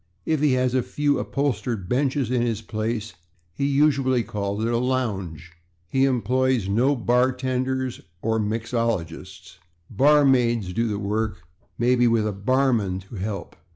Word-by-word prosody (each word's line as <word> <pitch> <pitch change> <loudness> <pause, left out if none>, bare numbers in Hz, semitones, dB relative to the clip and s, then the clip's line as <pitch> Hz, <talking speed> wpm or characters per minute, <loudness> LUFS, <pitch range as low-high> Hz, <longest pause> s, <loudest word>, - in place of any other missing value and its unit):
If 155 -3 0
he 150 -3 +3
has 125 -1 +1
a 130 - +2
few 145 +3 0
upholstered 125 -7 -2
benches 135 0 0
in 125 -2 +1
his 115 -2 -1
place 110 0 -3 0.4
he 140 +10 -1
usually 135 -3 +2
calls 105 -1 -3
it - - 0
a 120 - +1
/lounge/. 110 -10 -2 0.5
He 135 0 +3
employs 130 -2 +1
no 125 +8 +2
/bartenders/ 130 +1 0 0.2
or 110 +2 0
/mixologists/. 105 -6 -3 0.4
/Barmaids/ 125 -7 +3
do 115 +3 0
the 105 -2 -2
work, 105 +2 -1 0.3
with - - -37
maybe 120 +1 +3
a 110 -3 +2
/barman/ 105 -4 0
to - - -9
help. 100 +2 -5
120 Hz, 140 wpm, -24 LUFS, 105-130 Hz, 0.5 s, he